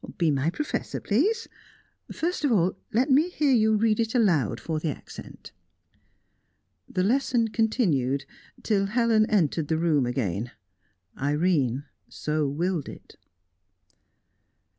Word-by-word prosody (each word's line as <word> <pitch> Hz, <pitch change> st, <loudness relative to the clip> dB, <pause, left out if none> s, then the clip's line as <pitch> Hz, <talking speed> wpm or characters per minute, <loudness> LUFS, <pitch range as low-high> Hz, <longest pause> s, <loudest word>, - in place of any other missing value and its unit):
Be 165 Hz, -3 st, +2 dB
my 140 Hz, +2 st, +1 dB
professor, 300 Hz, -, -3 dB
please. 405 Hz, -, 0 dB, 0.6 s
First 340 Hz, 0 st, -2 dB
of 285 Hz, -, +2 dB
all, 185 Hz, -4 st, +2 dB, 0.2 s
let 255 Hz, +6 st, +1 dB
me 300 Hz, +7 st, +4 dB
hear 300 Hz, -5 st, +1 dB
you 220 Hz, -3 st, +4 dB
read 215 Hz, 0 st, +2 dB
it 225 Hz, +1 st, -1 dB
aloud 155 Hz, -, +2 dB
for 160 Hz, -2 st, -3 dB
the 155 Hz, -, -2 dB
accent." 145 Hz, -, -10 dB, 1.4 s
The 185 Hz, -, -1 dB
lesson 240 Hz, +1 st, +1 dB
continued 170 Hz, -, 0 dB, 0.4 s
till 195 Hz, -3 st, +1 dB
Helen 225 Hz, 0 st, +2 dB
entered 165 Hz, -6 st, +1 dB
the 160 Hz, -, 0 dB
room 155 Hz, -6 st, +2 dB
again. 120 Hz, -3 st, -2 dB, 0.7 s
Irene 145 Hz, -3 st, +1 dB, 0.3 s
so 150 Hz, -1 st, -1 dB
willed 165 Hz, +2 st, -2 dB
it. -, -, -13 dB
185 Hz, 120 wpm, -26 LUFS, 150-230 Hz, 1.4 s, me